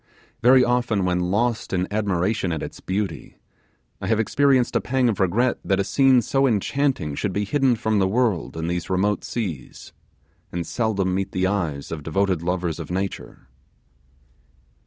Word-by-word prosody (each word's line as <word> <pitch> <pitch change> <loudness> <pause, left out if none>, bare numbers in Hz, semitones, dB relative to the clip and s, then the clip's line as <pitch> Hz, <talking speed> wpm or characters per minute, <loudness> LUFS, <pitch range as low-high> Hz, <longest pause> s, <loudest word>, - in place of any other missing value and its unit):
Very 125 +2 +6
often 120 -6 +1
when 90 -1 +1
lost 115 +4 0
in 90 0 0
admiration 100 -2 0
at 80 - -3
its - - -7
beauty, 95 -6 -4 0.6
I 95 - -3
have 110 +1 +2
experienced 130 +2 +2
a - - +3
pang 130 -1 +1
of 105 - -2
regret 110 +7 +1
that 95 0 +1
a - - +2
scene 130 +5 +4
so 135 +3 +2
enchanting 125 - 0
should 95 +7 -2
be 105 +2 -1
hidden 135 +2 +2
from 110 -1 0
the 95 - +3
world 100 - 0
in 80 - -3
these 85 0 -3
remote 100 +2 +1
seas, 95 - -6 0.6
and 85 -1 -3
seldom 100 -5 -1
meet 95 +1 -2
the 95 0 +1
eyes 85 -8 -2
of 80 -2 -4
devoted 90 +3 0
lovers 85 -2 -2
of 80 - -7
nature. 95 -6 -5
100 Hz, 165 wpm, -23 LUFS, 90-120 Hz, 0.6 s, Very